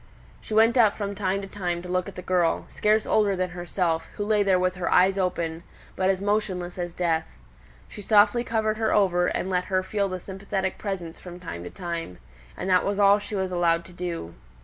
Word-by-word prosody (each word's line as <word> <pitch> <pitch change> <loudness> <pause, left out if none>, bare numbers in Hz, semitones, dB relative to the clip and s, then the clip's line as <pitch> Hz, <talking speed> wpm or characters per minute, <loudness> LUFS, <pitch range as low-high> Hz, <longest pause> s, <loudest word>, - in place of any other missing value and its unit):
She 215 - -5
went 225 +3 +5
up 215 -3 +4
from 200 -1 -3
time 195 0 -1
to - - -6
time 175 -3 -3
to - - -8
look 180 0 -1
at - - -13
the 180 - -7
girl, 175 -2 +1
scarce 215 +1 +2
older 205 -2 +2
than 185 -1 -2
herself, 175 -1 -1
who 205 - -3
lay 210 -1 +2
there 195 -2 +3
with 185 0 +1
her 180 -2 -3
eyes 190 +2 +5
open, 170 -4 -1 0.3
but 185 0 +1
as 190 -1 +1
motionless 190 -4 -1
as 175 -1 -4
death. 165 -3 0 0.6
She 210 - -10
softly 215 +3 +4
covered 220 -2 0
her 220 -1 +1
over, 180 -3 +3
and - - -2
let 180 -1 0
her 185 -1 0
feel 200 +1 -1
the 185 0 -4
sympathetic 190 0 -4
presence 180 -5 -5
from 180 -1 -10
time 125 - -7
to - - -6
time; 170 - -5 0.4
and - - -4
that 185 -1 +4
was 200 0 -1
all 200 0 +5
she 205 +1 -6
was 190 -1 -1
allowed 170 -1 +1
to 180 - -14
do. 170 - -5
185 Hz, 215 wpm, -25 LUFS, 175-205 Hz, 0.6 s, went